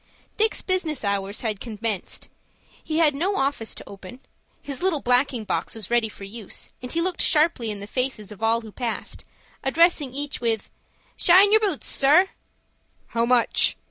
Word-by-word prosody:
Dick's 440 Hz, 0 st, +1 dB
business 340 Hz, -8 st, -1 dB
hours 200 Hz, 0 st, -1 dB
had 215 Hz, -4 st, -2 dB
commenced. 215 Hz, -4 st, -4 dB, 0.6 s
He 315 Hz, -, -2 dB
had 315 Hz, -3 st, +4 dB
no 360 Hz, +8 st, 0 dB
office 270 Hz, -, -1 dB
to -, -, -11 dB
open. 200 Hz, +5 st, -11 dB, 0.4 s
His 280 Hz, +2 st, -5 dB
little 360 Hz, -5 st, +1 dB
blacking 250 Hz, -1 st, +1 dB
box 215 Hz, -, -2 dB
was 220 Hz, -1 st, -8 dB
ready 235 Hz, -2 st, +2 dB
for 205 Hz, -, -12 dB
use, 205 Hz, +1 st, -7 dB
and 250 Hz, -, -6 dB
he 335 Hz, -, 0 dB
looked 360 Hz, 0 st, 0 dB
sharply 305 Hz, -7 st, +2 dB
in 205 Hz, -1 st, -5 dB
the -, -, -6 dB
faces 240 Hz, -3 st, -3 dB
of 210 Hz, -, -11 dB
all 225 Hz, +1 st, +2 dB
who 220 Hz, -2 st, -11 dB
passed, 235 Hz, +1 st, -5 dB, 0.4 s
addressing 305 Hz, -1 st, +3 dB
each 285 Hz, +1 st, -4 dB
with, 225 Hz, -3 st, -1 dB, 0.5 s
"Shine 380 Hz, +4 st, +6 dB
yer 435 Hz, -, +6 dB
boots, 395 Hz, -9 st, -2 dB
sir?" 310 Hz, +8 st, +4 dB, 0.8 s
"How 230 Hz, 0 st, 0 dB
much?" 250 Hz, -1 st, +3 dB
250 Hz, 170 wpm, -24 LUFS, 220-320 Hz, 0.8 s, Shine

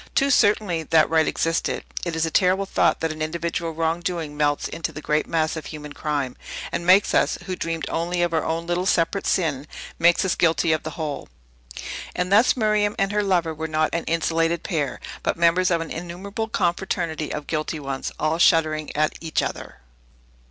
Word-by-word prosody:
Too 275 Hz, +1 st, +3 dB
certainly, 205 Hz, -8 st, +3 dB
that 160 Hz, 0 st, +3 dB
right 160 Hz, -1 st, +3 dB
existed. 165 Hz, 0 st, -1 dB, 0.2 s
It 170 Hz, -2 st, -2 dB
is 160 Hz, 0 st, +1 dB
a 160 Hz, -, -3 dB
terrible 190 Hz, +2 st, +3 dB
thought, -, -, +2 dB
that 160 Hz, -1 st, 0 dB
an 155 Hz, 0 st, -7 dB
individual 170 Hz, +1 st, -2 dB
wrong 165 Hz, +1 st, -1 dB
doing 170 Hz, -4 st, -3 dB
melts 145 Hz, -1 st, +1 dB
into 165 Hz, -, -4 dB
the -, -, -8 dB
great 150 Hz, 0 st, 0 dB
mass 160 Hz, -1 st, 0 dB
of 160 Hz, -, -6 dB
human 150 Hz, -2 st, -8 dB
crime, 145 Hz, -4 st, -2 dB, 0.4 s
and 170 Hz, -, -3 dB
makes 190 Hz, +2 st, +5 dB
us, -, -, +2 dB
who 185 Hz, 0 st, -3 dB
dreamed 165 Hz, -2 st, -3 dB
only 175 Hz, +1 st, -1 dB
of 175 Hz, -1 st, 0 dB
our 160 Hz, -, +1 dB
own 165 Hz, +1 st, -2 dB
little 175 Hz, +2 st, -1 dB
separate 175 Hz, +3 st, +1 dB
sin, 150 Hz, -5 st, 0 dB, 0.3 s
makes 170 Hz, +3 st, +4 dB
us 185 Hz, -, +2 dB
guilty 165 Hz, 0 st, +2 dB
of 155 Hz, -, +1 dB
the 155 Hz, -, -5 dB
whole. 150 Hz, -, -4 dB, 0.9 s
And 180 Hz, +1 st, -1 dB
thus 220 Hz, +6 st, +5 dB
Miriam 215 Hz, -2 st, +2 dB
and 195 Hz, 0 st, +1 dB
her 210 Hz, 0 st, +1 dB
lover 175 Hz, -5 st, +1 dB
were 160 Hz, +1 st, -4 dB
not 155 Hz, 0 st, 0 dB
an 170 Hz, -, -1 dB
insulated 165 Hz, +1 st, 0 dB
pair, 145 Hz, -7 st, -2 dB, 0.2 s
but -, -, -1 dB
members 170 Hz, +2 st, +3 dB
of 170 Hz, -2 st, +1 dB
an 165 Hz, -, -6 dB
innumerable 185 Hz, +6 st, -5 dB
confraternity 175 Hz, -5 st, -1 dB
of 150 Hz, -, -4 dB
guilty 155 Hz, 0 st, -2 dB
ones, 135 Hz, -2 st, -4 dB
all 155 Hz, +2 st, 0 dB
shuddering 155 Hz, -3 st, +3 dB
at 155 Hz, +1 st, +1 dB
each 160 Hz, -2 st, 0 dB
other. -, -, -6 dB
165 Hz, 195 wpm, -23 LUFS, 155-180 Hz, 0.9 s, makes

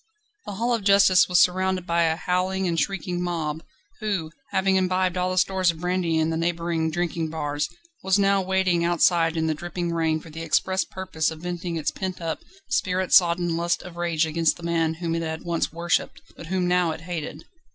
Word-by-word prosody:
The 205 Hz, -, -4 dB
Hall 235 Hz, +5 st, 0 dB
of 230 Hz, -3 st, -1 dB
Justice 195 Hz, -2 st, +5 dB
was 180 Hz, -, +4 dB
surrounded 185 Hz, 0 st, +2 dB
by 170 Hz, -1 st, +1 dB
a 160 Hz, 0 st, +1 dB
howling 185 Hz, +2 st, -1 dB
and 165 Hz, -1 st, 0 dB
shrieking 180 Hz, -2 st, -2 dB
mob, 160 Hz, -3 st, -2 dB, 0.4 s
who, 195 Hz, -8 st, -2 dB, 0.2 s
having 190 Hz, 0 st, +2 dB
imbibed 185 Hz, -1 st, +1 dB
all 180 Hz, 0 st, 0 dB
the 185 Hz, -, -3 dB
stores 185 Hz, -1 st, +2 dB
of 165 Hz, -1 st, -2 dB
brandy 180 Hz, -2 st, 0 dB
in 160 Hz, 0 st, +1 dB
the 160 Hz, -, -1 dB
neighbouring 170 Hz, -1 st, -1 dB
drinking 165 Hz, -1 st, -2 dB
bars, 145 Hz, -1 st, -2 dB, 0.3 s
was 190 Hz, +1 st, +2 dB
now 200 Hz, -1 st, +3 dB
waiting 185 Hz, -2 st, +1 dB
outside 170 Hz, -1 st, +2 dB
in 160 Hz, -, +1 dB
the 160 Hz, -, +1 dB
dripping 175 Hz, +2 st, -4 dB
rain 160 Hz, -1 st, +1 dB
for 160 Hz, 0 st, -13 dB
the 160 Hz, +2 st, -7 dB
express 185 Hz, +4 st, +1 dB
purpose 185 Hz, -4 st, -2 dB
of 160 Hz, -1 st, -9 dB
venting 175 Hz, -1 st, -4 dB
its 160 Hz, -2 st, -1 dB
pent 185 Hz, -1 st, -5 dB
up, 165 Hz, -2 st, -3 dB, 0.3 s
spirit 185 Hz, -8 st, 0 dB
sodden 175 Hz, -1 st, +4 dB
lust 170 Hz, +1 st, 0 dB
of 180 Hz, -2 st, -10 dB
rage 170 Hz, -2 st, 0 dB
against 160 Hz, 0 st, +1 dB
the 170 Hz, -, -13 dB
man 165 Hz, -1 st, 0 dB
whom 165 Hz, 0 st, -3 dB
it 165 Hz, -, -1 dB
had 160 Hz, -1 st, -4 dB
once 170 Hz, -1 st, -1 dB
worshipped, 170 Hz, +1 st, -1 dB
but 165 Hz, -, -10 dB
whom 180 Hz, 0 st, 0 dB
now 180 Hz, -1 st, +2 dB
it 160 Hz, 0 st, -5 dB
hated. 165 Hz, -3 st, -6 dB
175 Hz, 205 wpm, -24 LUFS, 165-185 Hz, 0.4 s, Justice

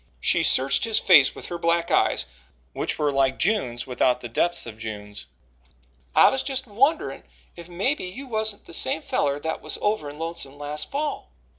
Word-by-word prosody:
She -, -, +3 dB
searched 135 Hz, +1 st, +3 dB
his 225 Hz, -2 st, +2 dB
face 155 Hz, -9 st, +6 dB
with -, -, -8 dB
her 175 Hz, -1 st, -5 dB
black 170 Hz, 0 st, +1 dB
eyes, -, -, +2 dB, 0.5 s
which -, -, -2 dB
were 150 Hz, -2 st, +1 dB
like 135 Hz, -1 st, +1 dB
June's 160 Hz, -, 0 dB
without 125 Hz, -1 st, +1 dB
the 120 Hz, -, -7 dB
depths 175 Hz, +9 st, 0 dB
of 110 Hz, -2 st, -10 dB
June's. 105 Hz, -2 st, -7 dB, 0.9 s
"I -, -, +7 dB
was 265 Hz, -, -1 dB
just 265 Hz, -1 st, -3 dB
a 210 Hz, -, -19 dB
wonderin' 275 Hz, +9 st, +1 dB, 0.3 s
if 170 Hz, 0 st, -11 dB
mebbe 200 Hz, -, 0 dB
you 195 Hz, +10 st, -6 dB
wasn't 220 Hz, -4 st, -2 dB
the -, -, -11 dB
same 160 Hz, 0 st, +1 dB
feller 140 Hz, 0 st, 0 dB
that 160 Hz, +1 st, -3 dB
was -, -, -4 dB
over 205 Hz, -8 st, -1 dB
in 145 Hz, -, -10 dB
Lonesome 165 Hz, -4 st, -5 dB
last 145 Hz, +1 st, -5 dB
fall." 290 Hz, +1 st, -3 dB
170 Hz, 185 wpm, -24 LUFS, 135-215 Hz, 0.9 s, I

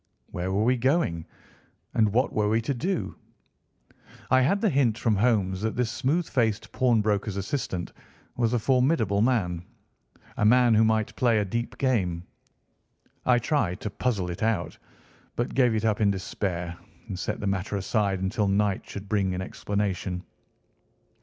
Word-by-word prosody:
Where 90 Hz, +2 st, -3 dB
were 100 Hz, +3 st, +1 dB
we 125 Hz, +2 st, +3 dB
going, 120 Hz, -, 0 dB, 0.7 s
and 110 Hz, -2 st, +3 dB
what 125 Hz, +5 st, +1 dB
were 105 Hz, -1 st, +1 dB
we 110 Hz, +1 st, +2 dB
to 125 Hz, +5 st, -1 dB
do? 175 Hz, +9 st, -2 dB, 1.2 s
I 130 Hz, 0 st, +6 dB
had 195 Hz, +10 st, +2 dB
the 220 Hz, -, +2 dB
hint 125 Hz, -6 st, +2 dB
from 115 Hz, -2 st, +1 dB
Holmes 100 Hz, -4 st, +1 dB
that 110 Hz, 0 st, -1 dB
this 120 Hz, -2 st, 0 dB
smooth 140 Hz, +7 st, 0 dB
faced 110 Hz, -5 st, 0 dB
pawnbroker's 105 Hz, -4 st, +1 dB
assistant 95 Hz, -3 st, -3 dB, 0.4 s
was 115 Hz, -2 st, +1 dB
a -, -, +3 dB
formidable 125 Hz, -, +2 dB
man—a 105 Hz, -, -3 dB
man 120 Hz, +2 st, +5 dB
who 110 Hz, +1 st, +5 dB
might 110 Hz, -1 st, +1 dB
play 120 Hz, -3 st, +3 dB
a 105 Hz, -, +1 dB
deep 115 Hz, +5 st, -3 dB
game. 95 Hz, -11 st, 0 dB, 1.0 s
I 125 Hz, -1 st, +5 dB
tried 115 Hz, -, 0 dB
to 105 Hz, -, -4 dB
puzzle 100 Hz, -7 st, -1 dB
it 85 Hz, -, -7 dB
out, 105 Hz, -8 st, 0 dB, 0.6 s
but 120 Hz, -, -2 dB
gave 125 Hz, -4 st, +3 dB
it 110 Hz, 0 st, -1 dB
up 110 Hz, -1 st, +1 dB
in 105 Hz, -, +4 dB
despair 90 Hz, -3 st, -3 dB, 0.3 s
and 90 Hz, -, -5 dB
set 105 Hz, -, -3 dB
the -, -, -4 dB
matter 100 Hz, +1 st, -1 dB
aside 100 Hz, -1 st, 0 dB
until 100 Hz, +2 st, 0 dB
night 100 Hz, 0 st, 0 dB
should 100 Hz, 0 st, -7 dB
bring 100 Hz, -3 st, 0 dB
an 90 Hz, -, -3 dB
explanation. 95 Hz, -2 st, -3 dB
110 Hz, 160 wpm, -26 LUFS, 95-120 Hz, 1.2 s, I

